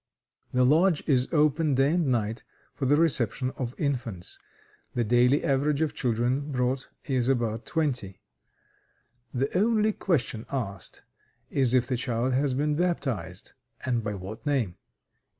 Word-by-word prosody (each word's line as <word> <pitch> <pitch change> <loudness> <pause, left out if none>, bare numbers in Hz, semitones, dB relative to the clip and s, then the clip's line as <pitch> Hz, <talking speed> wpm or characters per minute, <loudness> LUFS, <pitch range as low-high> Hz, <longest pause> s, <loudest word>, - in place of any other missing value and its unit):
The 125 0 +3
lodge 160 +5 +4
is 130 -4 +2
open 150 -2 +3
day 135 +2 +3
and 175 -4 +1
night 115 -2 -1 0.3
for 135 - -2
the 145 - +5
reception 130 -5 +1
of 125 -2 -5
infants. 120 - -3 0.6
The 120 - +2
daily 125 +5 +3
average 140 +1 +1
of 155 - -1
children 125 +4 0
brought 130 0 -1 0.2
is 130 -3 0
about 115 -3 0
twenty. 125 - -1 1.1
The 135 +5 -2
only 215 +2 +3
question 125 - -1
asked 100 - -5 0.5
is 130 -3 +3
if 125 -1 +3
the 125 -1 -1
child 120 +1 -1
has 135 0 +1
been 150 +2 +1
baptized, 130 - -2 0.3
and 120 -3 0
by 105 -1 -3
what 100 +3 -8
name. 130 - 0
130 Hz, 140 wpm, -27 LUFS, 120-145 Hz, 1.1 s, the